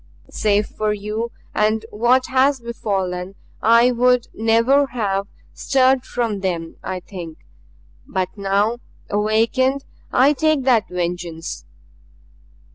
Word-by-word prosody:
Save 210 Hz, 0 st, +1 dB
for 215 Hz, 0 st, -2 dB
you 210 Hz, +3 st, -3 dB, 0.2 s
and 215 Hz, +1 st, +1 dB
what 240 Hz, +4 st, +3 dB
has 265 Hz, +1 st, +2 dB
befallen 195 Hz, -5 st, -3 dB, 0.3 s
I 235 Hz, +2 st, +5 dB
would 250 Hz, 0 st, +2 dB
never 230 Hz, +6 st, +3 dB
have 200 Hz, -6 st, -2 dB, 0.3 s
stirred 260 Hz, -1 st, +2 dB
from 230 Hz, -4 st, -2 dB
them, 170 Hz, -4 st, -3 dB
I 185 Hz, -1 st, -4 dB
think. 175 Hz, -4 st, -9 dB, 0.7 s
But 185 Hz, -1 st, -1 dB
now 200 Hz, +3 st, 0 dB, 0.3 s
awakened, 230 Hz, +6 st, +1 dB, 0.3 s
I 275 Hz, +4 st, +4 dB
take 310 Hz, -2 st, +1 dB
that 245 Hz, -5 st, +2 dB
vengeance. 175 Hz, -2 st, -4 dB
220 Hz, 110 wpm, -20 LUFS, 195-250 Hz, 0.7 s, I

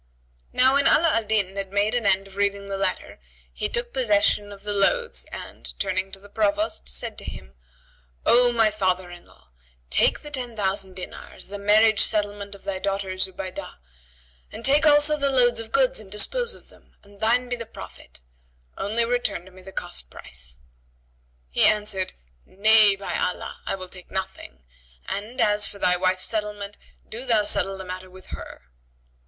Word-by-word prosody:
"[FN#75] -, -, -37 dB
Now 260 Hz, +1 st, +6 dB
when 280 Hz, 0 st, +4 dB
Ala 330 Hz, +1 st, +5 dB
al 225 Hz, -1 st, +1 dB
Din 200 Hz, -3 st, 0 dB
had 195 Hz, -1 st, -4 dB
made 205 Hz, +2 st, +1 dB
an 240 Hz, -4 st, +1 dB
end 195 Hz, 0 st, +3 dB
of 195 Hz, -, -15 dB
reading 200 Hz, 0 st, 0 dB
the 195 Hz, -, -3 dB
letter, 195 Hz, -, -3 dB, 0.3 s
he -, -, -2 dB
took 240 Hz, 0 st, -1 dB
possession 205 Hz, -4 st, +2 dB
of 200 Hz, -1 st, -11 dB
the 210 Hz, 0 st, -2 dB
loads 470 Hz, -, +1 dB
and, -, -, -9 dB
turning 190 Hz, 0 st, -1 dB
to 195 Hz, -, -10 dB
the 200 Hz, -, -14 dB
Provost, 310 Hz, -, -1 dB
said -, -, -3 dB
to -, -, -11 dB
him, 65 Hz, -, -9 dB, 0.7 s
"O 245 Hz, +1 st, +6 dB
my 225 Hz, -2 st, +3 dB
father 185 Hz, -3 st, 0 dB
in 175 Hz, 0 st, -12 dB
law, -, -, -23 dB, 0.4 s
take -, -, +3 dB
the 295 Hz, -, -8 dB
ten 250 Hz, -5 st, -4 dB
thousand 195 Hz, -2 st, -1 dB
dinars, 185 Hz, -, -8 dB
the 205 Hz, 0 st, -6 dB
marriage 215 Hz, +2 st, +5 dB
settlement 205 Hz, -1 st, 0 dB
of 195 Hz, -, -16 dB
thy 195 Hz, -1 st, -3 dB
daughter 195 Hz, -1 st, -2 dB
Zubaydah, 185 Hz, 0 st, -4 dB, 0.8 s
and -, -, -5 dB
take 290 Hz, +3 st, +5 dB
also 295 Hz, +1 st, +6 dB
the 280 Hz, -1 st, +2 dB
loads 245 Hz, -3 st, +4 dB
of 225 Hz, 0 st, -6 dB
goods 265 Hz, -4 st, +3 dB
and 200 Hz, -3 st, -12 dB
dispose 480 Hz, -, 0 dB
of -, -, -18 dB
them, -, -, -22 dB
and 200 Hz, 0 st, -19 dB
thine 240 Hz, +3 st, +2 dB
be 245 Hz, -, -1 dB
the 230 Hz, -2 st, -7 dB
profit; 220 Hz, -, -12 dB, 0.6 s
only 225 Hz, +4 st, +1 dB
return 210 Hz, -7 st, -2 dB
me 185 Hz, -, -14 dB
the 190 Hz, +1 st, -11 dB
cost 60 Hz, -, -4 dB
price." 60 Hz, -1 st, -8 dB, 0.9 s
He -, -, 0 dB
answered, 210 Hz, -3 st, +2 dB, 0.3 s
"Nay, 210 Hz, -, +5 dB
by 195 Hz, 0 st, -5 dB
Allah, 180 Hz, -, -3 dB
I -, -, 0 dB
will 185 Hz, -1 st, -6 dB
take 180 Hz, 0 st, -13 dB
nothing; 190 Hz, -, -6 dB, 0.4 s
and, 215 Hz, +5 st, -5 dB
as 210 Hz, 0 st, +3 dB
for 200 Hz, -, -10 dB
thy 180 Hz, -2 st, +3 dB
wife's 185 Hz, +1 st, +1 dB
settlement, 210 Hz, -2 st, -2 dB, 0.3 s
do 235 Hz, +3 st, -4 dB
thou 230 Hz, -5 st, +3 dB
settle 195 Hz, -1 st, +1 dB
the 190 Hz, -, -7 dB
matter 185 Hz, 0 st, -7 dB
with 185 Hz, 0 st, -15 dB
her." -, -, -8 dB
200 Hz, 180 wpm, -24 LUFS, 190-230 Hz, 0.9 s, Now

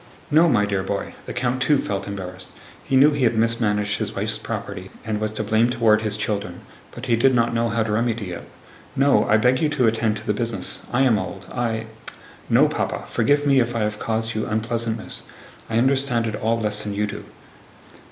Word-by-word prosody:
"No, 165 Hz, +3 st, +5 dB
my 105 Hz, -6 st, +3 dB
dear 100 Hz, -2 st, -1 dB
boy" 100 Hz, +1 st, -4 dB
(the -, -, -4 dB
count, 120 Hz, +2 st, -1 dB
too, 145 Hz, +2 st, +3 dB
felt 100 Hz, -5 st, -3 dB
embarrassed. 95 Hz, -2 st, -7 dB, 0.3 s
He 135 Hz, -, -1 dB
knew 140 Hz, +3 st, +6 dB
he 145 Hz, -2 st, -1 dB
had 115 Hz, 0 st, +2 dB
mismanaged 105 Hz, -2 st, 0 dB
his -, -, -3 dB
wife's -, -, -1 dB
property 90 Hz, +1 st, -6 dB, 0.2 s
and 110 Hz, -1 st, -2 dB
was 110 Hz, 0 st, -1 dB
to 110 Hz, -, -3 dB
blame 110 Hz, +3 st, +2 dB
toward 115 Hz, -3 st, +3 dB
his 110 Hz, -1 st, -1 dB
children, 100 Hz, -4 st, -3 dB, 0.3 s
but 120 Hz, -, -9 dB
he 120 Hz, -3 st, +2 dB
did 130 Hz, +3 st, +3 dB
not 120 Hz, 0 st, +2 dB
know 115 Hz, 0 st, +1 dB
how 115 Hz, 0 st, 0 dB
to 110 Hz, -, -3 dB
remedy 110 Hz, -3 st, -1 dB
it). 85 Hz, -, -8 dB, 0.5 s
"No, 135 Hz, -6 st, +4 dB
I 110 Hz, -, +4 dB
beg 125 Hz, +3 st, +3 dB
you 155 Hz, -, +2 dB
to 145 Hz, -4 st, +1 dB
attend 110 Hz, -1 st, +1 dB
to -, -, -10 dB
the 105 Hz, -, +1 dB
business. 115 Hz, -3 st, -4 dB
I 125 Hz, +2 st, +2 dB
am 120 Hz, -5 st, +3 dB
old. 95 Hz, 0 st, -6 dB
I..." 115 Hz, -2 st, -2 dB, 0.6 s
"No, -, -, +5 dB
Papa. -, -, -3 dB
Forgive 145 Hz, 0 st, +2 dB
me 140 Hz, -2 st, +4 dB
if 120 Hz, -1 st, 0 dB
I 115 Hz, -, 0 dB
have 105 Hz, 0 st, -2 dB
caused 115 Hz, 0 st, -2 dB
you 110 Hz, 0 st, -2 dB
unpleasantness. 115 Hz, 0 st, -2 dB, 0.5 s
I 115 Hz, -, 0 dB
understand 130 Hz, -1 st, +2 dB
it 110 Hz, -, -2 dB
all 115 Hz, +2 st, 0 dB
less 105 Hz, -1 st, +5 dB
than 105 Hz, -1 st, -4 dB
you 105 Hz, +1 st, 0 dB
do." 105 Hz, -, -7 dB
115 Hz, 210 wpm, -22 LUFS, 105-120 Hz, 0.6 s, knew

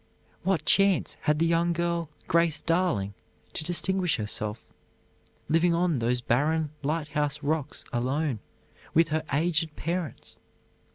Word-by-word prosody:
What 190 Hz, 0 st, 0 dB
chance 195 Hz, -2 st, +3 dB
had 150 Hz, 0 st, +2 dB
the 165 Hz, -, +2 dB
young 170 Hz, +1 st, +2 dB
girl, 170 Hz, -1 st, -1 dB, 0.2 s
Grace 170 Hz, -2 st, +2 dB
Darling, 165 Hz, -, 0 dB, 0.4 s
to -, -, -2 dB
distinguish 180 Hz, +1 st, +1 dB
herself, 105 Hz, 0 st, -3 dB, 0.8 s
living 165 Hz, +2 st, +3 dB
on 170 Hz, -5 st, +1 dB
those 120 Hz, +1 st, +1 dB
barren 150 Hz, +6 st, +1 dB
lighthouse 150 Hz, -1 st, -1 dB
rocks 150 Hz, -1 st, -2 dB
alone 130 Hz, +1 st, 0 dB, 0.6 s
with 165 Hz, 0 st, +5 dB
her 155 Hz, +1 st, 0 dB
aged 160 Hz, +1 st, +1 dB
parents? 170 Hz, -1 st, -4 dB
160 Hz, 120 wpm, -27 LUFS, 145-170 Hz, 0.8 s, with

